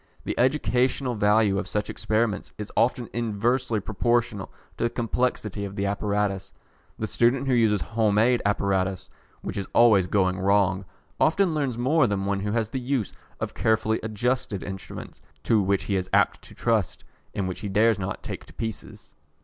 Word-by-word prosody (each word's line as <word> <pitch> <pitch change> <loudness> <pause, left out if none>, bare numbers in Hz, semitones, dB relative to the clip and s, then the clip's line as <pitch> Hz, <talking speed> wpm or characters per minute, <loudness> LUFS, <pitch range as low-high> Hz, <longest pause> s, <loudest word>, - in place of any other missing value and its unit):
The - - -2
educational 130 -1 +1
value 105 -2 +3
of 95 - -4
such 105 +1 -2
experiments 110 -1 -1
is 105 0 -6
often 120 0 +1
inversely 120 +1 0
proportional 110 0 -1 0.3
to - - 0
the - - +2
complexity 115 -3 -1
of 100 0 -6
the 100 - -1
apparatus. 100 -1 -1 0.5
The 110 - -2
student 120 +4 +2
who 130 - +2
uses 110 -5 +3
home 110 +3 +1
made 120 +3 +3
apparatus, 95 -2 0 0.3
which - - -4
is 95 - -4
always 105 -6 +6
going 95 -2 +1
wrong, 95 0 +2 0.3
often 170 +2 +3
learns 140 -6 -1
more 130 +3 +3
than 100 -2 -1
one 100 0 0
who 105 +1 -2
has 115 -2 -1
the 130 - -2
use 125 -4 -2 0.3
of - - -3
carefully 110 -1 +1
adjusted 110 -1 -2
instruments, 95 -1 -8 0.2
to 110 -2 +3
which 100 0 +1
he 100 - -1
is 95 -1 -2
apt - - +3
to - - -14
trust, - - 0 0.3
and 95 - -1
which 90 - -5
he 105 - -4
dares 105 +2 +3
not 95 0 -4
take - - -6
to - - -16
pieces. 110 -2 -7
105 Hz, 175 wpm, -25 LUFS, 100-120 Hz, 0.5 s, always